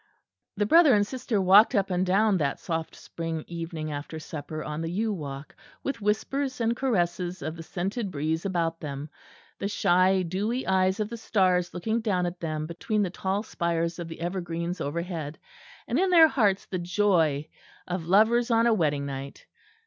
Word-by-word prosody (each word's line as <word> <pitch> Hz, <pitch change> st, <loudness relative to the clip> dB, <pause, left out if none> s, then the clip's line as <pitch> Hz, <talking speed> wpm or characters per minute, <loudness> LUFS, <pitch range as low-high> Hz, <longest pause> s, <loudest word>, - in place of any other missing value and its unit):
The 205 Hz, -, +2 dB
brother 310 Hz, +1 st, +6 dB
and 205 Hz, 0 st, +3 dB
sister 245 Hz, -2 st, -2 dB
walked 195 Hz, +4 st, +6 dB
up 200 Hz, -1 st, +1 dB
and 180 Hz, 0 st, +1 dB
down 195 Hz, +2 st, +3 dB
that 140 Hz, -4 st, 0 dB
soft 165 Hz, -2 st, -4 dB
spring 165 Hz, -2 st, -5 dB
evening 165 Hz, -2 st, -5 dB
after 145 Hz, +2 st, -6 dB
supper, 155 Hz, 0 st, -6 dB
on 150 Hz, +1 st, -4 dB
the 165 Hz, -, -3 dB
yew 210 Hz, +5 st, -1 dB
walk; 140 Hz, -5 st, -7 dB, 0.3 s
with 275 Hz, -, -2 dB
the 210 Hz, -, -10 dB
whispers 260 Hz, +6 st, -1 dB
and 230 Hz, 0 st, +1 dB
caresses 180 Hz, -7 st, -1 dB
of 155 Hz, -, -4 dB
the 165 Hz, -, -8 dB
scented 195 Hz, +6 st, -3 dB
breeze 160 Hz, +1 st, -2 dB
about 170 Hz, -4 st, -1 dB
them, 145 Hz, 0 st, -6 dB, 0.5 s
the 200 Hz, -, -1 dB
shy 185 Hz, -1 st, +3 dB
dewy 205 Hz, +9 st, -2 dB
eyes 190 Hz, +1 st, +2 dB
of 210 Hz, -, 0 dB
the 235 Hz, -, -6 dB
stars 185 Hz, -5 st, +1 dB
looking 220 Hz, +6 st, -1 dB
down 190 Hz, -5 st, 0 dB
at 175 Hz, 0 st, -4 dB
them 155 Hz, -2 st, -3 dB
between 205 Hz, +6 st, -1 dB
the 180 Hz, -, -2 dB
tall 190 Hz, +2 st, -2 dB
spires 170 Hz, -4 st, -2 dB
of 170 Hz, -, -5 dB
the 165 Hz, 0 st, -9 dB
evergreens 175 Hz, 0 st, -3 dB
overhead; 160 Hz, 0 st, -4 dB, 0.5 s
and 250 Hz, -, +1 dB
in 380 Hz, +1 st, +2 dB
their 335 Hz, -3 st, +8 dB
hearts 205 Hz, -8 st, +2 dB
the 185 Hz, -, -4 dB
joy 175 Hz, -5 st, +1 dB, 0.4 s
of 175 Hz, -2 st, -4 dB
lovers 225 Hz, +6 st, +4 dB
on 230 Hz, 0 st, +4 dB
a 235 Hz, -, +4 dB
wedding 150 Hz, -7 st, +1 dB
night. 135 Hz, 0 st, -7 dB
180 Hz, 180 wpm, -27 LUFS, 165-210 Hz, 0.5 s, their